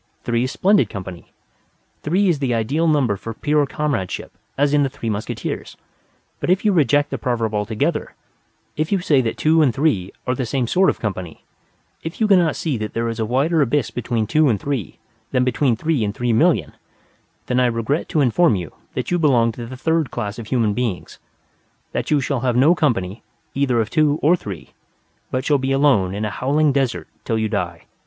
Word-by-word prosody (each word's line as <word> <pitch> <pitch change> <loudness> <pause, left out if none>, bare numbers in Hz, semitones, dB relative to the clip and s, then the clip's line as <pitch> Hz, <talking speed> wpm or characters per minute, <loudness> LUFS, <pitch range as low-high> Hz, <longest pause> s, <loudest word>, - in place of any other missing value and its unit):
Three 120 +1 0
is 130 - -3
splendid 200 +2 +3
company: 95 -3 -8 0.7
three 185 +7 +1
is 170 -6 +2
the 130 -4 0
ideal 140 +9 0
number 140 -9 +2
for 115 +3 -7
pure 150 +1 +1
comradeship: 140 -12 -3 0.2
as 145 +1 +2
in 145 - +4
the 140 - +1
Three 115 -3 -4
Musketeers. 105 +1 -5 0.6
But - - -3
if 190 +3 +2
you 210 - +4
reject 145 -3 +2
the 135 - -3
proverb 115 -2 -1
altogether; 105 +1 -1 0.6
if 155 +4 -2
you 200 - +2
say 145 -6 +3
that 115 -2 -3
two 160 +1 +3
and 140 -5 +4
three 110 - 0
are 125 - 0
the 130 -1 -3
same 130 0 0
sort 185 +10 +3
of - - -2
company; 95 -6 -5 0.6
if 165 - -7
you 220 - +3
cannot 180 -6 +4
see 150 -7 -2
that 110 0 -5
there 115 0 0
is 115 0 -5
a 110 - -1
wider 145 +7 +2
abyss 140 0 +1
between 120 -2 -1
two 150 +6 +3
and 105 -5 +1
three 135 - -4 0.3
than 125 0 +1
between 125 0 +1
three 150 0 0
and 100 0 -2
three 120 0 0
million 110 - +2 0.7
then 125 0 0
I 125 - +4
regret 120 +6 -1
to 155 - +1
inform 140 +1 +3
you 90 -5 -5 0.2
that - - -3
you 175 - +2
belong 120 -7 +3
to 115 +1 -8
the 130 +2 -8
Third 160 +2 0
Class 105 +2 -4
of 115 - -7
human 115 -4 +1
beings; 115 -6 -3 0.7
that - - -3
you 150 - +3
shall 135 0 -1
have 125 -1 0
no 140 +7 +5
company 115 - -1 0.3
either 135 -4 +1
of 115 0 -1
two 155 -2 +3
or 165 +5 +5
three, 95 - -8 0.6
but 130 +1 -2
shall 145 -2 +3
be 135 +1 -1
alone 135 -10 +3
in 105 +1 -2
a 105 - -3
howling 145 +7 +1
desert 135 -3 -1 0.2
till 115 - -1
you 110 0 0
die. 85 -4 -3
130 Hz, 205 wpm, -21 LUFS, 110-150 Hz, 0.7 s, no